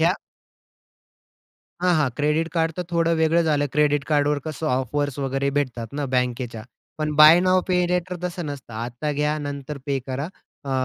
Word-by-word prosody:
ह्या 170 Hz, +3 st, +4 dB, 1.7 s
हां, 180 Hz, -1 st, +4 dB
हां, 145 Hz, -4 st, +2 dB
क्रेडिट 150 Hz, +3 st, +1 dB
कार्डतर 165 Hz, +2 st, 0 dB
थोडं 170 Hz, 0 st, +2 dB
वेगळं 160 Hz, +1 st, +3 dB
झालं. 145 Hz, -2 st, +1 dB
क्रेडिट 145 Hz, -1 st, +2 dB
कार्डवर 145 Hz, -1 st, +2 dB
कसं 155 Hz, 0 st, -4 dB
ऑफर्स 140 Hz, +2 st, -1 dB
वगैरे 135 Hz, 0 st, -1 dB
भेटतात 120 Hz, -5 st, -2 dB
ना 145 Hz, 0 st, -2 dB
बँकेच्या, 125 Hz, -3 st, -2 dB, 0.4 s
पण 150 Hz, -1 st, -1 dB
बाय 155 Hz, +3 st, +9 dB
नाऊ 185 Hz, 0 st, +3 dB
पे 180 Hz, -1 st, +3 dB
लेटर 180 Hz, 0 st, -1 dB
तसं 175 Hz, -1 st, -3 dB
नसतं. 140 Hz, -5 st, -7 dB
आता 120 Hz, +6 st, -3 dB
घ्या 150 Hz, +1 st, 0 dB
नंतर 145 Hz, 0 st, -5 dB
पे 140 Hz, -1 st, 0 dB
करा. 135 Hz, +5 st, -3 dB, 0.4 s
अ, 140 Hz, -, -5 dB
150 Hz, 160 wpm, -23 LUFS, 135-160 Hz, 1.7 s, बाय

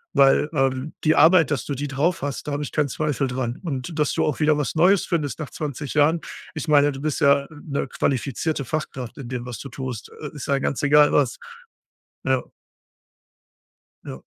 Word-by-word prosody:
Weil, 140 Hz, +1 st, +5 dB
ähm, 135 Hz, +1 st, 0 dB
die 155 Hz, 0 st, +4 dB
Arbeit, 160 Hz, -2 st, +6 dB
dass 135 Hz, -6 st, -1 dB
du 145 Hz, -, -3 dB
die 145 Hz, +2 st, -3 dB
drauf 150 Hz, +6 st, 0 dB
hast, 145 Hz, +1 st, -4 dB
da -, -, -2 dB
habe 145 Hz, -, -2 dB
ich -, -, -6 dB
keinen 150 Hz, -2 st, 0 dB
Zweifel 145 Hz, -1 st, -1 dB
dran. 125 Hz, -1 st, -3 dB
Und 155 Hz, 0 st, -4 dB
dass 150 Hz, -, +2 dB
du -, -, +1 dB
auch 150 Hz, -, -1 dB
wieder 155 Hz, -1 st, +3 dB
was 150 Hz, +1 st, -2 dB
Neues 185 Hz, +4 st, +4 dB
findest 155 Hz, -5 st, -2 dB
nach 150 Hz, -5 st, -5 dB
20 145 Hz, -1 st, -5 dB
Jahren. 155 Hz, +3 st, +3 dB, 0.3 s
Ich 155 Hz, -, -4 dB
meine, 145 Hz, -1 st, +5 dB
du 135 Hz, -, -8 dB
bist 155 Hz, +1 st, -2 dB
ja 140 Hz, -1 st, +4 dB
'ne 145 Hz, -3 st, -4 dB
qualifizierte 140 Hz, +3 st, -1 dB
Fachkraft 130 Hz, -4 st, -4 dB
in 135 Hz, -, -7 dB
dem, 125 Hz, -1 st, -4 dB
was 125 Hz, -1 st, -6 dB
du 140 Hz, -, -7 dB
tust. 130 Hz, -3 st, -6 dB
Äh, 150 Hz, -1 st, -7 dB
ist 145 Hz, -, -6 dB
ja 140 Hz, -1 st, +2 dB
ganz 135 Hz, -, -2 dB
egal 145 Hz, +1 st, +6 dB
was. -, -, +2 dB, 0.9 s
Ja. -, -, +1 dB, 1.6 s
Ja. -, -, -8 dB
145 Hz, 195 wpm, -23 LUFS, 135-155 Hz, 1.6 s, Arbeit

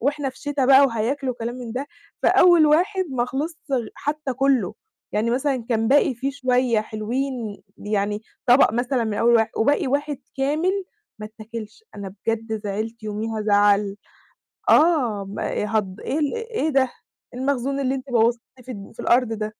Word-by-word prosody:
وإحنا 280 Hz, +2 st, 0 dB
في -, -, -18 dB
شتا 290 Hz, -2 st, -1 dB
بقى 270 Hz, +1 st, +8 dB
وهياكلوا 255 Hz, +3 st, -1 dB
وكلام 235 Hz, 0 st, -5 dB
من 245 Hz, -3 st, -7 dB
ده. 260 Hz, +4 st, -3 dB, 0.4 s
فأول 345 Hz, -3 st, +6 dB
واحد 370 Hz, +6 st, +2 dB
ما 245 Hz, -2 st, 0 dB
خلِصش 295 Hz, +6 st, -3 dB, 0.2 s
غ 245 Hz, -4 st, 0 dB
حتى 295 Hz, -2 st, -3 dB
كُلّه، 255 Hz, -6 st, +1 dB, 0.4 s
يعني 220 Hz, +3 st, 0 dB
مثلًا، 260 Hz, -1 st, 0 dB
كان 225 Hz, -1 st, +1 dB
باقي 275 Hz, -1 st, +4 dB
فيه 265 Hz, +4 st, -2 dB
شوية 250 Hz, -4 st, +1 dB
حلوين، 225 Hz, +1 st, -4 dB, 0.2 s
يعني 205 Hz, 0 st, -2 dB, 0.2 s
طبق 245 Hz, -2 st, +6 dB
مثلًا 245 Hz, +1 st, 0 dB
من 220 Hz, -2 st, -2 dB
أول 235 Hz, +3 st, +3 dB
واح 225 Hz, -1 st, +3 dB
وباقي 285 Hz, +6 st, +2 dB
1 285 Hz, +1 st, -1 dB, 0.2 s
كامل 320 Hz, +8 st, 0 dB, 0.4 s
ما 215 Hz, -, -5 dB
اتاكِلش. 220 Hz, -, -10 dB
أنا 195 Hz, -2 st, -7 dB
بجد 225 Hz, -1 st, -1 dB
زعِلت 215 Hz, +3 st, -4 dB
يوميها 215 Hz, +1 st, -3 dB
زعَلّ 205 Hz, -1 st, +3 dB, 0.7 s
آه، 260 Hz, -, +4 dB
ما 205 Hz, +1 st, -3 dB
هض 190 Hz, -1 st, -5 dB
إيه 295 Hz, -, -2 dB
ال 295 Hz, -2 st, 0 dB
إيه 460 Hz, -7 st, -2 dB
ده؟ 275 Hz, -2 st, +4 dB, 0.5 s
إيه 250 Hz, -, -6 dB
المخزون 275 Hz, 0 st, -1 dB
اللي 265 Hz, 0 st, 0 dB
أنتِ 265 Hz, 0 st, -6 dB
بوّظتيه 235 Hz, 0 st, +2 dB, 0.2 s
في 255 Hz, -, -11 dB
الد 200 Hz, -3 st, -10 dB
في -, -, -8 dB
الأرض 240 Hz, -1 st, +2 dB
ده؟ 215 Hz, 0 st, -3 dB
245 Hz, 170 wpm, -23 LUFS, 220-275 Hz, 0.7 s, بقى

